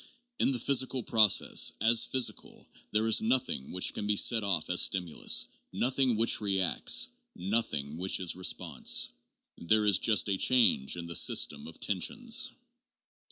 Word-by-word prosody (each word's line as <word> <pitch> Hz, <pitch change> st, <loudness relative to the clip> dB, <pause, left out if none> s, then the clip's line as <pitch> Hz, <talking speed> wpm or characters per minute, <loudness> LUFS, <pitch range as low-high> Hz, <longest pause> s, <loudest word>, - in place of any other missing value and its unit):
In -, -, +1 dB
the 130 Hz, -, -1 dB
physical 130 Hz, 0 st, -1 dB
process, 110 Hz, -3 st, +3 dB
as 115 Hz, +2 st, +4 dB
physical, 130 Hz, -3 st, -3 dB, 0.2 s
there 110 Hz, +1 st, -1 dB
is 110 Hz, -, +3 dB
nothing 120 Hz, -, -2 dB
which 90 Hz, -, -1 dB
can 105 Hz, -, -6 dB
be 105 Hz, -, 0 dB
set 115 Hz, +2 st, +3 dB
off 95 Hz, -6 st, -2 dB
as 90 Hz, -, +3 dB
stimulus, 90 Hz, -4 st, +1 dB, 0.2 s
nothing 130 Hz, -1 st, -1 dB
which 115 Hz, +1 st, +1 dB
reacts, 95 Hz, -3 st, 0 dB, 0.3 s
nothing 85 Hz, -7 st, -4 dB
which 95 Hz, +1 st, 0 dB
is 90 Hz, -3 st, 0 dB
response. 90 Hz, 0 st, -1 dB, 0.5 s
There 105 Hz, +5 st, 0 dB
is 100 Hz, -3 st, +3 dB
just 110 Hz, -2 st, +2 dB
a 95 Hz, -2 st, -2 dB
change 115 Hz, -, +1 dB
in 85 Hz, -, -7 dB
the 85 Hz, 0 st, -7 dB
system 70 Hz, -, +2 dB
of 80 Hz, -, -13 dB
tensions. 230 Hz, -, -1 dB
105 Hz, 150 wpm, -28 LUFS, 90-120 Hz, 0.5 s, as